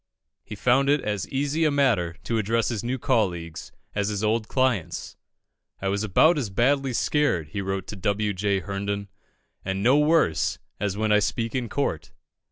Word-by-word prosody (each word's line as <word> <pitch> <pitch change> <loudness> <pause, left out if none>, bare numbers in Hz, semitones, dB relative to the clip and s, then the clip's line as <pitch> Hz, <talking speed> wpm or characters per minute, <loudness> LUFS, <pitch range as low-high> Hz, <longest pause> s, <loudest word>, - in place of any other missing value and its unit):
He 105 - -8
found 125 +6 +2
it 145 +1 +4
as 105 -2 -3
easy 145 +4 0
a 155 - +4
matter 120 - +1
to 115 -1 -1
address 115 +1 +1
his 115 -5 -3
new 125 +2 -1
colleagues 90 - -1 0.2
as 100 -1 -1
his 105 0 -2
old 110 0 +1
clients. 130 - -1 0.6
"I 95 - -1
was 100 +2 -1
about 150 - +4
as 120 -7 -3
badly 135 +6 +1
scared," 115 - +1
he 100 - -4
wrote 95 -1 -3
to 105 - -7
W. 100 +2 0
J. 100 0 0
Herndon, 100 +2 -4 0.5
"and 95 +1 -2
no 130 +5 +5
worse, 150 - +2 0.2
as 100 -1 -2
when 110 0 0
I 105 - +6
speak 115 +2 -1
in 125 -3 -2
court." 105 - -2
105 Hz, 175 wpm, -25 LUFS, 100-130 Hz, 0.6 s, I